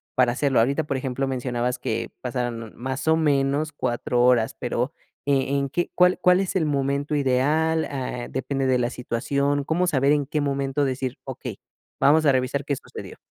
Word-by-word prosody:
para 125 -2 +3
hacerlo? 135 -2 +2
Ahorita, 140 +7 +2
por 140 - -2
ejemplo, 135 +1 -2
mencionabas 125 -1 -2
que - - -3
pasaron 120 -3 -3
más 130 +5 -4
o 160 - +5
menos, 145 0 +1
4 120 -3 0
horas, 120 -3 +3
pero, 125 +4 -1 0.3
¿e 140 0 +1
en 140 0 -1
qué 175 +6 -1
cuál 180 0 +4
cuál 180 +1 +4
es 190 0 -3
el 160 -5 +2
momento 140 +1 0
ideal? 150 +4 +2
Ah, 125 -3 -4
¿depende 135 0 -2
de 130 -1 +3
la 120 0 0
situación? 140 +4 -1
¿Cómo 170 +5 0
saber 140 -3 +3
en 145 -2 +2
qué 150 0 -1
momento 140 0 0
decir: 130 -1 -3
"Okey, - - -7 0.4
vamos 155 +3 +5
a - - +7
revisar 130 +2 0
qué 140 - 0
sucedió"? - - -10
135 Hz, 180 wpm, -24 LUFS, 125-145 Hz, 0.4 s, a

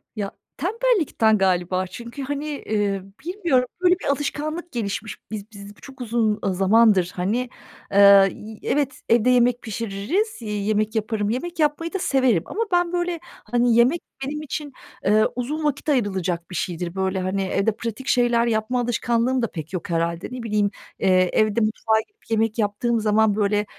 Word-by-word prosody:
Ya, 200 -2 -3 0.3
tembellikten 360 - +2
galiba. 185 -1 +1
Çünkü, 235 +8 -8
hani, 290 +1 -4
ııı, 200 -3 0 0.2
bilmiyorum, 340 -9 +1 0.2
böyle 360 0 +5
bir - - -8
alışkanlık 300 +4 -2
gelişmiş. 220 -1 -4
Biz 215 +1 -6
biz 200 0 -11
çok 265 -2 -12
uzun, 225 -2 0
ııı, 190 -2 0
zamandır, 195 -2 +4
hani, 225 +8 -1 0.4
ııı, 200 -1 +8
y 215 0 -10
evet, 285 -1 -1
evde 235 +2 +4
yemek 245 0 +3
pişiririz, 230 - -2
yemek 215 0 -1
yaparım, 215 -1 -1
yemek 335 +9 -3
yapmayı 310 +3 0
da 385 - -1
severim. 255 - +2
Ama 455 - -2
ben, 350 -1 +2
böyle, 350 -1 -1
hani, 240 -6 0
yemek 250 +9 +4 0.2
benim 300 +2 -4
için, 295 -1 -5 0.3
ııı, 215 +2 +4
uzun 285 +6 -3
vakit 295 +1 -1
ayrılacak 190 - 0
bir - - -6
şeydir. 175 +1 -3
Böyle, 190 0 -1
hani, 185 +1 -1
evde 195 +3 +1
pratik 230 +4 -6
şeyler 240 -1 +3
yapma 225 +2 0
alışkanlığım 240 +1 0
da 230 - +1
pek 160 +1 -7
yok 180 +1 -4
herhâlde. 170 +1 -1
Ne 250 -2 -6
bileyim, 210 -2 +1 0.3
ııı, 190 - +4
evde 200 +4 +3
mutfağa 220 0 +1
gidip 415 - -30
yemek 225 0 +1
yaptığım 225 +2 0
zaman, 215 -1 +3
böyle, 210 0 +1
225 Hz, 160 wpm, -23 LUFS, 200-270 Hz, 0.4 s, ııı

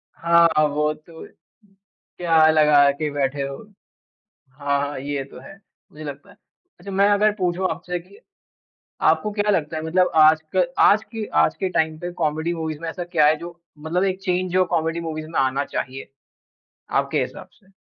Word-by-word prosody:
हाँ, 170 0 +4 0.2
वो 150 +1 0
तो 160 +2 -13 0.9
क्या 165 -3 +4
लगा 150 -2 +5
के 150 +2 -3
बैठे 140 0 -1
हो। 140 0 -5 1.0
हाँ, 140 0 -1
ये 140 0 -3
तो 135 - -13
है, 135 - -12 0.4
मुझे 155 +1 -11
लगता 145 -2 -8
है। - - -21 0.4
अच्छा, 200 - -9
मैं 195 +1 +3
अगर 210 +1 +3
पूछूँ 185 -1 -1
आपसे 180 +1 -4
कि 180 - -18 0.8
आपको 210 - +2
क्या 205 0 0
लगता 160 -3 -1
है 155 - -4
मतलब 180 +3 +2
आजक 160 +9 +3
आज 215 +2 +5
की 225 -2 -4 0.2
आज - - 0
के 190 - -1
टाइम 160 -3 0
पे 175 +1 -5
कॉमेडी 160 +3 0
मूवीज 160 -2 -4
में 165 - -4
ऐसा 175 +2 -5
क्या 170 -4 +2
है 155 - +4
जो 170 +1 -10 0.2
मतलब 165 +4 -1
एक 190 0 -1
चेंज 180 -1 -1
जो 185 0 +3
कॉमेडी 165 -1 -1
मूवीज 155 -1 -5
में 165 - -1
आना 135 +1 0
चाहिए? 135 +1 -5 0.8
आपके - - 0
हिसाब - - -6
से। 195 - -28
160 Hz, 175 wpm, -22 LUFS, 150-180 Hz, 1.0 s, लगा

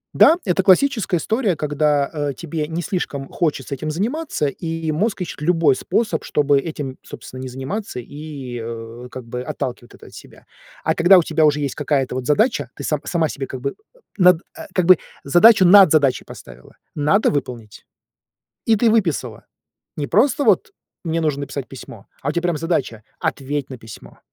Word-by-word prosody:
Да, 330 - +6
это 185 0 +2
классическая 205 0 +3
история, 215 - 0
когда, 150 -1 +1 0.2
э, 140 - -3
тебе 160 -2 -4
не 165 +2 -4
слишком 150 -8 -3
хочется 155 -4 -2
этим 155 +3 -4
заниматься, 225 - -2
и 165 +2 -4
мозг 195 +5 -1
ищет 170 - -6
любой 165 -3 +3
способ, 220 - -1
чтобы 145 -1 +2
этим, 140 -3 -6
собственно, 130 - -10
не 130 - -5
заниматься, 135 - -5
и, 140 -2 -8
э, 115 +1 -8
как 130 -2 -9
бы 125 +1 -5
отталкивает 125 -1 -6
это - - -16
от - - -16
себя. - - -14 0.4
А 160 - +1
когда 175 +4 +6
у 175 - +4
тебя 160 -1 +2
уже 150 0 +2
есть 140 -2 -2
какая-то 140 -3 -1
вот 130 0 -4
задача, 150 - +1
ты 140 - -8
са 150 0 -1
сама 165 -3 0
себе 140 -2 -5
как 130 - -7
бы 140 - -2
э, - - -13 0.5
над 180 -2 +5 0.3
как 180 -2 +1
бы 185 0 +7 0.2
задачу 185 +7 +6
над 190 -2 +8
задачей 145 -5 +2
поставила. 65 0 -13 0.2
Надо 155 +8 +2
выполнить. 120 -7 -5 0.8
И 225 - +4
ты 225 +1 +3
выписала. 190 -9 -1 0.5
Не 145 - -2
просто 255 - +2
вот: - - +2 0.3
"Мне 165 -1 -1
нужно 150 -3 -1
написать 140 -1 -5
письмо". 115 -5 -11 0.2
А 140 - -2
у - - +1
тя 170 - -1
прям 175 -3 0
задача: 145 -10 -2 0.2
"Ответь 140 0 -3
на 130 - -7
письмо". 110 -1 -13
150 Hz, 180 wpm, -20 LUFS, 135-180 Hz, 0.8 s, над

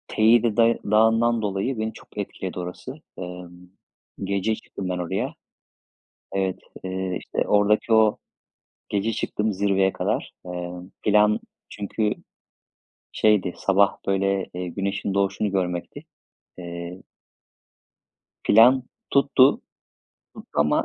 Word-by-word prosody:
Teide 115 0 +3
day 115 0 +4
Dağı'ndan 115 +2 +4
dolayı 105 +5 -1
beni 110 0 -2
çok - - -16
etkiledi - - -5
orası. 130 - -7 0.2
Emm, 90 0 -9 0.5
gece 100 +3 0
çıktım 100 -3 -7
ben 90 - -1
oraya. 90 -1 -2 1.0
Evet, 95 -1 -1 0.3
eee, 95 0 -3
işte, - - -3
oradaki 105 +2 +3
o 110 -1 +5 0.7
gece 105 +2 0
çıktım 105 0 -1
zirveye 95 -1 +2
kadar. - - -2
Emm, 90 0 -6
plan 105 0 +4 0.3
çünkü 105 +1 -1 1.0
şeydi, 105 -4 +2
sabah 100 +1 +3
böyle, 100 0 +1
eee, 90 0 -4
güneşin 100 +2 -2
doğuşunu 100 +1 0
görmekti. 90 -2 -3 0.5
Eee 85 +1 -7 1.4
Plan 120 +4 +6 0.3
tuttu, 140 -1 +6 0.9
tuttu - - -12
ama 75 +1 +2
100 Hz, 105 wpm, -24 LUFS, 90-110 Hz, 1.4 s, Plan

